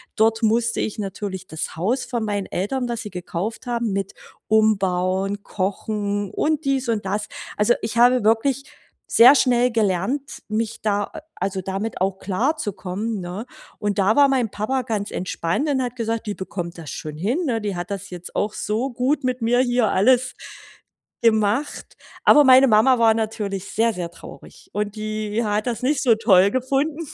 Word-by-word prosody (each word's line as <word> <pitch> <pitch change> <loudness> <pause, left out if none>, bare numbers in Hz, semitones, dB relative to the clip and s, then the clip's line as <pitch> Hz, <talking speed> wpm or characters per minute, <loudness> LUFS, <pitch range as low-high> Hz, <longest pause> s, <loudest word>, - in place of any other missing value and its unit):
Dort 225 +1 +2
musste 230 +1 +1
ich 215 - -2
natürlich 195 -2 -5
das 160 - -5
Haus 215 +11 -1
von 235 -3 -3
meinen 205 -2 -2
Eltern, 245 +7 -2
das 235 -1 -3
sie 210 - -7
gekauft 185 +7 -5
haben, 235 -3 -1
mit 195 0 -3 0.3
umbauen, 195 -2 +1
kochen 205 +1 -2
und 310 0 0
dies 270 -2 0
und 215 -3 -1
das. 210 +2 -2 0.3
Also, 210 +3 +4
ich 220 +1 -3
habe 245 -1 +5
wirklich 240 +5 +2 0.5
sehr 245 +4 +9
schnell 250 -2 +3
gelernt, 225 +6 -1
mich 220 0 -2
da 205 -1 +1
a 320 - -10 0.2
also 195 -1 -1
damit 195 +4 -4
auch 190 0 -1
klarzukommen, 205 - -2
ne? 185 +7 -6 0.3
Und 205 -2 -1
da 200 +2 +3
war 285 -1 +6
mein 255 -5 0
Papa 255 +5 -1
ganz 215 -4 -3
entspannt 180 - -2
und 270 -3 +1
hat 250 -1 -3
gesagt: 230 -1 -3
„Die 205 - -2
bekommt 175 -2 -6
das 160 -4 -8
schon 155 -1 -6
hin, 220 - 0
ne? 230 -4 0
Die 205 -3 -3
hat 175 0 -5
das 200 -1 -6
jetzt 180 -1 -9
auch 210 +1 0
so 230 +6 -2
gut 260 +4 0
mit 255 -1 -1
mir 240 +2 +3
hier 245 -3 +2
alles 250 +6 +3 0.9
gemacht.“ 220 +5 +1 0.3
Aber 295 - +7
meine 260 0 +7
Mama 235 +3 +4
war 225 -1 +5
natürlich 210 -3 -3
sehr, 225 +1 +2
sehr 175 -2 -5
traurig - - -14
und 210 +1 -2
die 215 +1 -2
hat 210 +1 -1
das 240 0 -2
nicht 275 +2 +1
so 245 -4 +5
toll 200 -3 +4
gefunden. 275 +4 0
220 Hz, 175 wpm, -22 LUFS, 200-245 Hz, 0.9 s, sehr